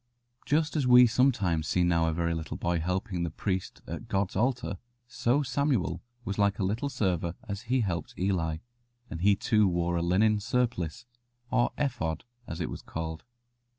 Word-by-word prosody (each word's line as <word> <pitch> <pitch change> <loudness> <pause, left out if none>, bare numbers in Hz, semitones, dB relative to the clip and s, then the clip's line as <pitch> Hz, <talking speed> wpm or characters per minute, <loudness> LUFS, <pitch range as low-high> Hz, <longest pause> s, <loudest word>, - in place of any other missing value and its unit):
Just 155 +1 +1
as 140 -5 +1
we 125 0 +9
sometimes 110 - +2
see 90 - +2
now 85 -2 +3
a - - +2
very 85 +1 0
little 80 -1 -4
boy 85 0 0
helping 90 +2 -2
the 85 - -1
priest 95 +3 -3
at - - -6
God's 95 -1 -1
altar, 120 -5 0 0.3
so 125 +3 +1
Samuel 125 - 0 0.2
was 100 -1 -3
like 100 -1 +3
a - - -1
little 110 +9 -1
server 90 -8 -1
as 105 +4 -6
he 130 0 +3
helped 90 -5 -3
Eli, 90 -4 0 0.5
and 85 - -5
he 100 +2 +5
too 105 0 +3
wore 85 -1 0
a - - 0
linen 105 +5 +3
surplice, 120 -3 -1 0.5
or 120 - +3
ephod 120 - -1 0.2
as 85 - -5
it 85 - -2
was - - -6
called. 80 0 -5
95 Hz, 175 wpm, -29 LUFS, 85-120 Hz, 0.5 s, we